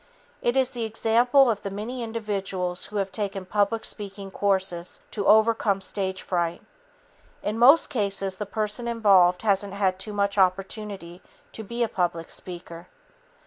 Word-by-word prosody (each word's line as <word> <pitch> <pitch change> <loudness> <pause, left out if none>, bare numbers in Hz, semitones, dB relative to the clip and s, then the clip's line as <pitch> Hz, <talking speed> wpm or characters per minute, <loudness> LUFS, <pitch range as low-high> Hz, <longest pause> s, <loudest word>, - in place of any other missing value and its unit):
It 240 +2 +1
is 260 -1 +2
the 240 -3 -4
example 235 +4 +3
of 220 -4 0
the 200 - -4
many 220 +6 -5
individuals 195 -5 -3
who 210 - -12
have 195 -2 -1
taken 195 -1 -4
public 205 +3 0
speaking 200 -2 -4
courses 190 -3 0
to 205 -3 -2
overcome 220 -1 +4
stage 190 -1 -3
fright. 175 -2 -2 0.8
In 215 +2 -2
most 275 +7 +6
cases, 195 -5 -1
the 210 - -5
person 215 +3 -1
involved 195 -6 +4
hasn't 200 -2 +1
had 190 -2 0
too 210 +3 -5
much 200 0 0
opportunity 190 -1 -1 0.3
to 220 - -7
be 235 +3 -2
a - - +1
public 170 -4 -2
speaker. 170 -1 -8
200 Hz, 150 wpm, -25 LUFS, 190-220 Hz, 0.8 s, most